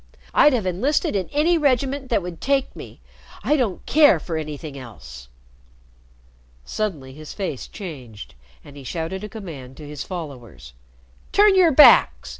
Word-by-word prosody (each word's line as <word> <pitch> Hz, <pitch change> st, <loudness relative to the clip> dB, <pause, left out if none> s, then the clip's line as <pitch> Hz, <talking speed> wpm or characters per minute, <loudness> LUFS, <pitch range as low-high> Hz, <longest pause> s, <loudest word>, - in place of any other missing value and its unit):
"I'd 295 Hz, -, +5 dB
have 230 Hz, -6 st, -1 dB
enlisted 260 Hz, -, 0 dB
in 190 Hz, -2 st, -2 dB
any 320 Hz, +4 st, +2 dB
regiment 270 Hz, -1 st, 0 dB
that 220 Hz, -6 st, +1 dB
would 175 Hz, -2 st, -8 dB
take 275 Hz, -1 st, 0 dB
me. -, -, -11 dB, 0.4 s
I 300 Hz, -, +2 dB
don't 235 Hz, -10 st, -2 dB
care 290 Hz, -, +5 dB
for 165 Hz, +1 st, -6 dB
anything 150 Hz, -1 st, -6 dB
else." 65 Hz, -, -11 dB, 1.4 s
Suddenly 155 Hz, -12 st, -4 dB
his 155 Hz, +2 st, -10 dB
face 185 Hz, -10 st, -5 dB
changed, 130 Hz, -, -10 dB, 0.3 s
and 145 Hz, -, -14 dB
he 140 Hz, -, -11 dB
shouted 165 Hz, +7 st, -5 dB
a 210 Hz, -, -6 dB
command 150 Hz, -, -10 dB
to 150 Hz, -, -10 dB
his 150 Hz, -1 st, -6 dB
followers. 120 Hz, -, -9 dB, 0.6 s
"Turn 410 Hz, 0 st, +5 dB
your 365 Hz, -4 st, +5 dB
backs!" 295 Hz, +2 st, +6 dB
180 Hz, 150 wpm, -22 LUFS, -, 1.4 s, backs